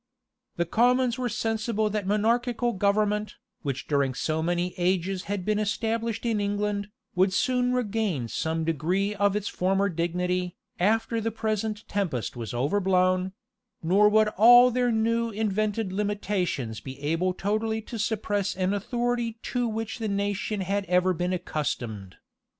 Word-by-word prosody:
The 170 - 0
commons 245 +5 +2
were 250 -1 -1
sensible 220 0 -1
that 210 -2 -2
monarchical 235 +3 +1
government, 210 +2 +1 0.3
which 135 -3 -4
during 140 -3 +1
so 155 +4 -1
many 175 +2 -1
ages 185 +1 0
had 200 -2 -3
been 215 0 +1
established 225 +2 -1
in 220 -3 +1
England, 205 0 -1 0.2
would 185 +1 +3
soon 250 +5 +1
regain 210 - -1
some 160 +7 -2
degree 175 +6 0
of 200 0 +1
its 210 -1 -2
former 195 +2 +1
dignity, 180 +1 -1 0.2
after 225 +4 +1
the 225 - 0
present 215 -1 -3
tempest 160 - -2
was 115 -2 -5
overblown; 185 +6 +1 0.5
nor 200 +5 +5
would 215 0 +4
all 245 +4 +8
their 245 0 +1
new 230 +1 +1
invented 215 -1 -1
limitations 190 - -2
be 130 +3 -9
able 165 +6 0
totally 215 +4 -1
to 230 +1 -7
suppress 205 -2 -1
an 185 +1 0
authority 235 +2 -1
to 245 -1 -1
which 225 +2 -4
the 220 - -2
nation 200 +1 -1
had 200 +2 -1
ever 180 0 +3
been 180 +1 -1
accustomed. 120 - -3
205 Hz, 145 wpm, -26 LUFS, 180-220 Hz, 0.5 s, all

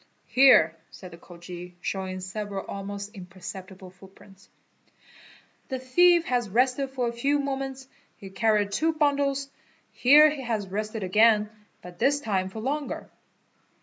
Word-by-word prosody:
"Here" 250 -12 +6
said 185 -2 -12
the 170 - -12
Khoji, 175 0 -11
showing 185 0 -4
several 200 +1 -5
almost 200 +1 -7
impercep 185 -1 -9
tible 185 -1 -13
footprints, 195 +1 -18 1.2
"the 260 - -2
thief 340 +7 +4
has 245 -4 -1
rested 255 +5 +1
for 255 -2 -2
a 235 - -3
few 275 +5 +1
moments, 270 -1 -4 0.3
he 195 -1 -11
carried 210 -1 +1
two 320 +10 +1
bundles. 280 -2 0 0.4
Here 295 +4 +6
he 290 -2 -6
has 225 -5 -3
rested 215 +2 -4
again, 210 +2 +3 0.3
but 180 -1 -12
this 285 +1 +2
time 190 -7 -2
for 220 +3 -8
longer." 285 +4 -4
215 Hz, 140 wpm, -26 LUFS, 190-270 Hz, 1.2 s, Here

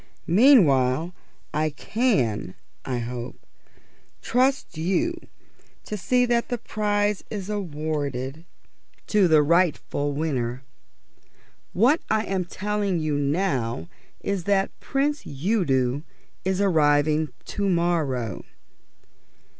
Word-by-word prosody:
Meanwhile 170 - +4 0.4
I 155 +1 +1
can, 145 - 0 0.3
I 125 -2 -2
hope, 120 +1 -6 0.7
trust 260 -4 +1
you 190 - 0 0.7
to 215 - -4
see 250 +5 +2
that 235 -1 0
the 245 - -1
prize 205 -2 -1
is 205 -1 -5
awarded 150 -6 -3 0.6
to 205 -3 +3
the 155 -2 +5
rightful 150 -3 +1
winner. 130 -5 -2 1.1
What 255 - +4
I 215 0 +2
am 190 -3 -2
telling 205 0 -1
you 155 -2 -1
now 140 - -1 0.3
is 195 -4 -2
that 195 -1 +2
the - - -24
Prince 290 +2 0
Udo 140 - 0 0.4
is 190 0 0
arriving 155 -4 +3 0.2
to 200 -1 -2
morrow." 155 - 0
170 Hz, 100 wpm, -24 LUFS, 140-205 Hz, 1.1 s, the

